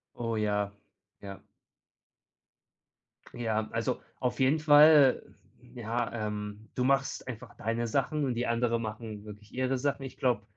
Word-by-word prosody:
Oh, 115 -1 -2
ja, 105 -1 0 0.5
ja. 100 -1 -8 2.0
Ja, 110 -2 -1
also 115 +3 -2 0.2
auf 125 0 -2
jeden 135 +4 +3
Fall. 150 -2 +7 0.5
Ja, 120 0 -2
ähm 105 -1 -5
du 125 - 0
machst 135 0 0
einfach 120 -4 -8
deine 115 +2 -2
Sachen 145 +4 0
und 130 - 0
die 120 +1 -1
anderen 115 0 +1
machen 110 -1 -6
wirklich 105 0 -12
ihre 130 +1 0
Sachen. 140 +1 -1
Ich 135 -1 -8
glaube, 120 -5 +1
115 Hz, 135 wpm, -29 LUFS, 110-130 Hz, 2.0 s, Fall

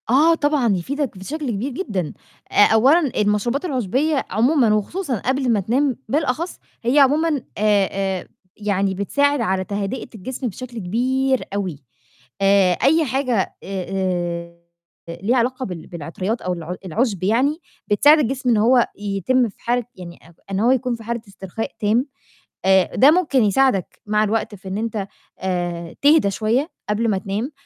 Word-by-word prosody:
آه، 305 +7 +5
طبعًا، 290 -9 +1
يفيدك 275 - -3
بشكل 275 +8 -4
كبير 230 +7 -3
جدًا. 200 - -3 0.4
آآ، - - -9 0.2
أولًا 265 +9 +5 0.2
المشروبات 210 - 0
العُشبية 270 - 0
عمومًا 235 +2 +3
وخصوصًا 255 - -1
قبل 260 +4 0
ما 215 - +2
تنام 250 +6 0
بالأخص، 300 +4 -1 0.2
هي 250 +5 +3
عمومًا 295 +1 +3 0.2
آآ 205 -2 +3 0.3
آآ، - - -12 0.3
يعني 200 -2 0
بتساعد 285 +8 +1
على 190 -3 0
تهدئة 200 +6 -4
الجسم 250 +5 -5
بشكل 240 +3 -8
كبير 260 +7 0
أوي. 180 -9 -3 0.6
آآ 195 -2 +4 0.8
آآ 180 -3 -3 0.6
ليها 205 +9 0
علاقة 255 +2 0
بال 175 -4 -7
بالعطريات 180 +7 -4
أو 180 - -2
الع 170 +1 -5
العُشب 200 +1 -1
يعني 260 - +2 0.3
بتساعد 290 +9 +5
الجسم 260 -1 -1
إن 230 - +4
هو 240 +3 +4
يتم 205 +5 +1
في - - -18
حالة 245 +1 0
يعني 170 -2 -10
أ - - -19 0.2
إن 195 - -1
هو 235 +4 +4
يكون 255 -1 +1
في 230 - -11
حالة 235 +1 -3
استرخاء 195 +2 -6
تام. 225 +4 +2 0.6
آآ، 190 -1 +3
ده 275 +4 +7
ممكن 310 -7 +2
يساعدك 210 -2 +1
مع 210 0 +2
الوقت 215 0 -1
في 190 0 -13
إن 190 +1 -3
أنت 215 -3 -3 0.3
آآ، 175 -2 -3
تهدى 290 -8 +5
شوية 230 - 0 0.2
قبل 225 +2 +1
ما 200 - +1
تنام، 200 +8 -3
225 Hz, 150 wpm, -21 LUFS, 195-265 Hz, 0.8 s, ده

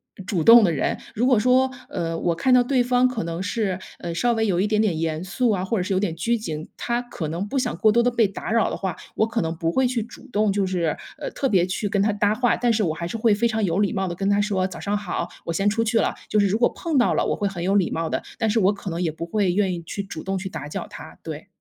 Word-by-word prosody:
呃， 195 - -10
主 185 -3 -1
动 230 0 +9
的 180 - +3
人， 150 - -1 0.2
如 245 +4 +1
果 255 -3 +5
说， 255 +4 +4 0.2
呃， 165 - -3
我 170 +1 0
看 210 +10 +2
到 250 -1 +6
对 255 0 +2
方 245 +1 +3
可 250 -8 -1
能 170 +2 -4
是， 200 -2 -1 0.2
呃， 170 -1 -5
稍 240 +7 +2
微 225 -1 +1
有 180 -2 +1
一 - - +2
点 215 0 +2
点 200 -7 +1
严 160 -1 -2
肃 230 +7 0
啊， 190 -4 0
或 210 - -1
者 185 - 0
是 185 - -4
有 185 - +2
点 185 -5 -1
拘 235 +8 0
谨， 160 -8 -6
他 240 0 -1
可 240 -10 -6
能 170 +5 -3
不 270 +6 -1
想 250 -1 -1
过 215 -1 +4
多 235 +2 +4
地 245 - +3
被 235 -2 +2
打 200 - -5
扰 230 -2 +3
的 - - -4
话， 190 -4 -3 0.2
我 220 - +2
可 230 0 -1
能 165 -1 -2
不 165 0 0
会 260 - +3
去 245 -2 0
主 230 - -13
动 210 -2 +2
就 200 -1 +1
是， 175 -4 0 0.2
呃， - - -4
特 270 - -1
别 185 -5 +3
去 185 +3 -2
跟 200 0 +1
他 210 +1 +2
搭 205 0 +2
话。 245 +2 +2
但 240 -1 +1
是 225 -1 +1
我 170 -6 +1
还 170 +2 -5
是 175 +7 -4
会 220 -1 +3
非 225 +3 0
常 220 -1 +1
有 170 -1 0
礼 200 - +1
貌 190 0 -1
地 175 - -4
跟 195 +2 -1
他 205 0 +3
说： 200 -3 +1
“早 - - -8
上 205 0 -1
好， 190 -4 -3 0.2
我 170 - -3
先 195 +5 +1
出 225 +2 0
去 230 +1 +1
了。” - - 0 0.2
就 210 - +3
是 200 - +4
如 200 +3 +1
果 240 - +3
碰 325 -4 -2
到 245 - +3
了， - - +1
我 - - 0
会 205 - -3
很 185 -3 -6
有 190 +3 +1
礼 195 -4 +2
貌 165 0 -1
的， - - -2 0.2
但 225 -2 +1
是 215 - +1
我 190 +1 +4
可 200 -1 -6
能 170 +1 -3
也 170 -3 0
不 160 +2 -6
会 195 +1 +1
愿 190 0 +1
意 170 - -5
去 190 +4 -4
主 195 -5 -7
动 195 0 -2
去 190 +1 -4
打 150 -6 -6
搅 - - -5
他， - - -11
对。 - - -7
205 Hz, 335 characters per minute, -23 LUFS, 175-230 Hz, 0.2 s, 动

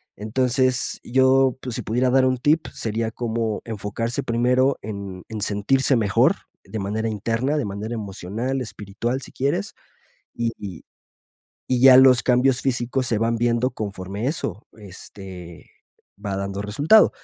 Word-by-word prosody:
Entonces, 125 +4 0
yo, 130 +1 +3
pues, 125 -3 -5
si - - -3
pudiera 125 +3 +1
dar 130 +1 +4
un 130 0 +2
tip, 150 +6 +2
sería 110 0 -2
como 115 -2 -2
enfocarse 115 +2 -3
primero 125 +3 +2
en 100 -3 -7
en 110 -1 -5
sentirse 120 +7 +2
mejor 105 -5 +3 0.3
de 110 - -6
manera 105 +3 -2
interna, 115 +7 -1
de 145 - -1
manera 105 +3 -5
emocional, 110 +5 -3
espiritual, 115 +3 -4
si - - -11
quieres, 135 -7 -1 0.6
y 115 -1 -1
y 95 -5 -8 0.8
y 125 -1 +1
ya 130 0 +9
los 130 -1 +7
cambios 125 +1 +3
físicos 125 0 -1
se 110 - +1
van 115 +1 +1
viendo 120 +2 +1
conforme 100 0 -5
eso, 115 - -4
este, 95 -3 -11 0.6
va 100 -1 -2
dando 100 0 -3
resultado. 145 - +5
115 Hz, 145 wpm, -23 LUFS, 105-130 Hz, 0.8 s, ya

